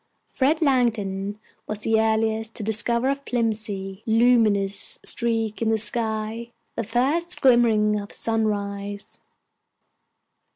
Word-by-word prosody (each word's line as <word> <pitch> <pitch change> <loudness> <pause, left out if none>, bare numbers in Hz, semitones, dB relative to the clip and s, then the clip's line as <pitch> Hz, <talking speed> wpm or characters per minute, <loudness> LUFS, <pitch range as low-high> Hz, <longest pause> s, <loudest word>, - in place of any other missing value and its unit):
Fred 300 +4 +1
Langdon 210 -7 0 0.3
was 215 0 -5
the 220 0 +2
earliest 220 0 -1
to 220 - -5
discover 235 +3 +1
a - - 0
filmy, 220 -7 -3
luminous 220 -4 +2
streak 225 -2 -1
in 225 - +1
the 225 - +2
sky, 220 +1 0 0.2
the 230 - -2
first 285 - 0
glimmering 225 -5 +3
of 200 0 -9
sunrise. 205 -2 -3
220 Hz, 110 wpm, -23 LUFS, 210-235 Hz, 0.3 s, glimmering